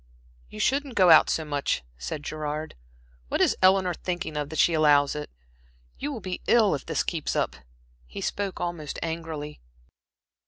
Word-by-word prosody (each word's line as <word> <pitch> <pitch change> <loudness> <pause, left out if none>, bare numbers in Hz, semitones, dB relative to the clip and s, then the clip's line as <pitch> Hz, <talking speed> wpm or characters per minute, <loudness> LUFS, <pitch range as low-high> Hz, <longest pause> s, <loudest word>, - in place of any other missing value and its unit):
"You 105 - -10
shouldn't 275 - 0
go 185 -3 +6
out 160 - +7
so 160 - 0
much," 145 - -1
said 60 - -6
Gerard. 155 +1 -4 0.5
"What - - -1
is - - +3
Eleanor 185 -1 +4
thinking 175 -2 -4
of 145 -1 -2
that 160 - -6
she 170 - +4
allows 145 -3 +4
it? 150 - -5 0.7
You 280 - -3
you - - -3
will 260 - -5
be 185 -1 -5
ill 220 -6 +5
if 140 - -3
this - - 0
keeps 165 -4 -3
up." - - 0 0.5
He - - -8
spoke 200 -2 -3
almost 170 -4 -4
angrily. 160 -3 -5
160 Hz, 170 wpm, -26 LUFS, 150-185 Hz, 0.7 s, out